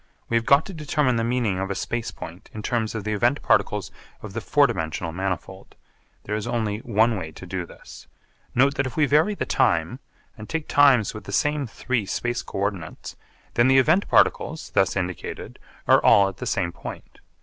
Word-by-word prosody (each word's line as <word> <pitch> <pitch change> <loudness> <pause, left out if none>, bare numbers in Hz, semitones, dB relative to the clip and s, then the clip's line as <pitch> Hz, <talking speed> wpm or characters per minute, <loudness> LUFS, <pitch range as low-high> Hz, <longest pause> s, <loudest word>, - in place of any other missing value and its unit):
We 115 - 0
have 115 - -2
got 140 +2 +5
to 195 - -8
determine 150 -5 0
the 115 - 0
meaning 115 -5 0
of 95 0 -3
a 100 - -2
space 120 +3 -3
point 85 +3 -10
in 105 - -6
terms 115 -1 -1
of 110 - -3
the 110 +1 -2
event 120 +7 +1
particles - - +1 0.3
of - - -8
the - - -3
four - - +4
dimensional 80 +1 -3
manifold. 95 0 -5 0.5
There 105 - -5
is 110 +2 -2
only 110 -3 -1
one 115 0 +2
way 80 -3 -6
to 90 - -10
do 90 -1 -4
this. - - -14 0.5
Note 140 +3 +4
that 135 -1 +1
if 130 - -9
we 155 - +4
vary 155 +9 +3
the - - -3
time - - +1 0.4
and 105 - -10
take 160 -2 -3
times 135 -7 +4
with 110 -2 -9
the - - -7
same 150 -2 0
three 115 -2 -2
space 120 +4 -2
co - - -8
ordinates, 95 -5 -4 0.4
then 120 +1 +4
the 135 0 +5
event 160 +9 +4
particles, 160 +1 +2
thus 95 -4 +2
indicated, 90 -2 -5 0.3
are - - +5
all 100 -1 +6
at 95 - -11
the - - -5
same 85 -2 0
point. - - -10
115 Hz, 205 wpm, -24 LUFS, 95-135 Hz, 0.5 s, all